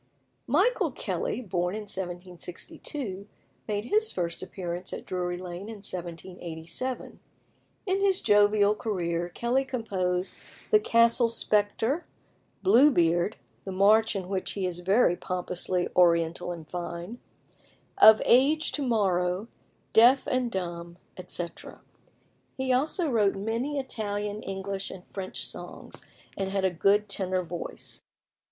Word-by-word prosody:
Michael - - +3
Kelly, - - -3
born 180 -2 -1
in 215 - -4
1762, 190 - -6 0.4
made 210 0 -2
his 435 - +2
first 170 -2 -2
appearance 180 -1 -5
at - - -6
Drury 180 -1 -2
Lane 180 +3 -7
in 215 -3 -9
1787. 175 +5 -5 0.7
In 380 0 +1
his 390 -2 +3
jovial 205 0 +4
career 175 -5 -2
Kelly 240 +8 0
composed 195 -8 -2 0.4
"The 430 - +7
Castle 230 - +4
Spectre," 225 +7 +1 0.6
"Blue 295 -6 +7
Beard" 175 - +2 0.3
(the 190 - -5
march 210 +4 +4
in 190 -2 -3
which 190 +1 -3
is 180 -3 -2
very 190 +1 +3
pompously 180 0 -2
oriental 170 0 +3
and 165 -3 -8
fine), 175 +6 -6 0.8
"Of 220 0 +9
Age 290 +6 +4
To 295 - -2
morrow," 195 -4 +1 0.4
"Deaf 245 +4 +6
and 255 -1 0
Dumb," 170 -2 -5 0.2
etc. 175 -1 -6 0.8
He 260 -1 +1
also 310 +6 +1
wrote 210 -4 +3
many 230 +8 -2
Italian, 210 -5 -3
English, 195 0 -4
and 185 - -9
French 190 -1 -5
songs, - - -9 0.3
and 195 -1 -2
had 195 -1 0
a 190 - +2
good 200 +4 +3
tenor 185 -2 0
voice. 175 0 -6
195 Hz, 120 wpm, -28 LUFS, 180-230 Hz, 0.8 s, Of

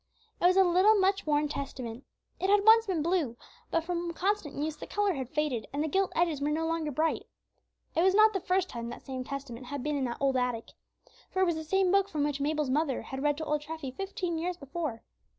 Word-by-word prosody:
It - - +2
was 370 +1 +4
a 385 - +8
little, 370 +4 +5
much 390 -2 +2
worn 295 0 +2
Testament. 265 -4 -6 0.3
It 375 - 0
had 410 0 +4
once 450 0 +7
been 345 -6 0
blue, 320 -9 0 0.3
but 330 - +1
from 345 0 -3
constant 375 -4 -1
use 300 +1 -2
the - - -9
color 410 -2 +1
had 260 -5 -4
faded, 295 -7 -1
and 285 +2 -1
the - - 0
gilt 385 +5 +1
edges 325 -4 +1
were 290 - +1
no 315 +2 0
longer 325 -1 -1
bright. 315 +3 0 0.7
It 330 - +3
was 380 +2 +4
not 430 +1 +6
the 385 - 0
first 370 +1 +1
time 235 -5 -6
that - - -9
same 260 -2 -4
Testament 260 -2 -7
had 285 -1 -4
been 300 0 -1
in 275 -2 0
that 240 -1 -3
old 270 -1 +2
attic. 250 -2 -1 0.6
For 375 - +1
it - - +5
was 340 -2 +1
the 315 - -4
same 375 +3 +2
book 395 0 +3
from 305 -6 -1
which 290 -1 -1
Mabel's 300 -2 0
mother 285 -2 0
had 265 0 -6
read 290 0 +1
to 315 - -4
old 300 -1 0
Treffy 305 -3 -6
fifteen 370 -4 -3
years 350 +1 -2
before. 280 -5 -5
315 Hz, 240 wpm, -30 LUFS, 280-370 Hz, 0.7 s, a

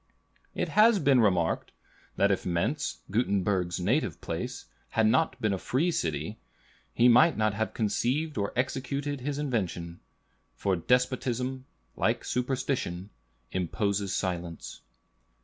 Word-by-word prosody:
It - - -1
has 220 +1 +5
been 140 -8 +4
remarked, 90 -7 +1 0.4
that 100 +1 +3
if 95 - 0
Mentz, 90 - -1
Gutenberg's 95 -5 +1
native 100 - 0
place, - - -5 0.2
had 110 - +2
not 130 +9 +2
been 105 -2 +1
a 95 - -2
free 155 - +1
city, 80 - -2 0.5
he 120 - +4
might 145 +6 +6
not 110 -1 +2
have 110 +2 -2
conceived 130 +8 0
or 100 -1 -1
executed 140 +2 -2
his 145 +2 -3
invention; 95 - -2 0.6
for 95 +9 0
despotism, 125 +5 0 0.3
like - - 0
superstition, 125 -7 -2 0.4
imposes 100 +2 -1
silence. 85 -4 -4
110 Hz, 120 wpm, -28 LUFS, 95-130 Hz, 0.6 s, might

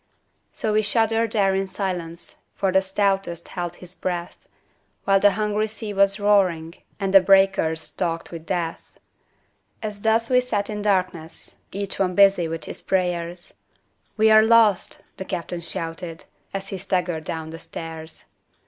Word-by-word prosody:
So 215 - -2
we 215 - +4
shuddered 225 +1 +1
there 195 -3 +3
in 195 0 0
silence, 180 -4 -5 0.2
For 195 -1 0
the 190 +1 +4
stoutest 195 -3 -1
held 175 -1 -4
his 180 0 -12
breath, 175 -2 -5 0.6
While 195 0 +4
the 205 0 +5
hungry 210 +1 0
sea 215 -1 -6
was 195 0 +3
roaring 185 -6 +2 0.3
And 195 -1 -1
the 195 - +9
breakers 190 -4 +3
talked 165 -2 -3
with 165 -1 -9
death. 170 -2 -4 0.9
As 210 -1 -5
thus 225 +1 +2
we 250 0 +4
sat 215 -4 -2
in 210 0 -4
darkness 185 -5 -2
Each 200 0 -4
one 185 -2 +1
busy 195 -4 +5
with 165 0 -5
his - - -5
prayers, 175 -2 -2 0.6
"We 220 0 +5
are 215 0 +8
lost!" 220 -4 +3 0.2
the 190 - -5
captain 175 -2 -4
shouted, 165 -1 -4 0.3
As 195 0 -5
he 195 - -5
staggered 180 -4 -1
down 160 0 -5
the 165 - -8
stairs. 160 -1 -8
190 Hz, 155 wpm, -23 LUFS, 170-205 Hz, 0.9 s, the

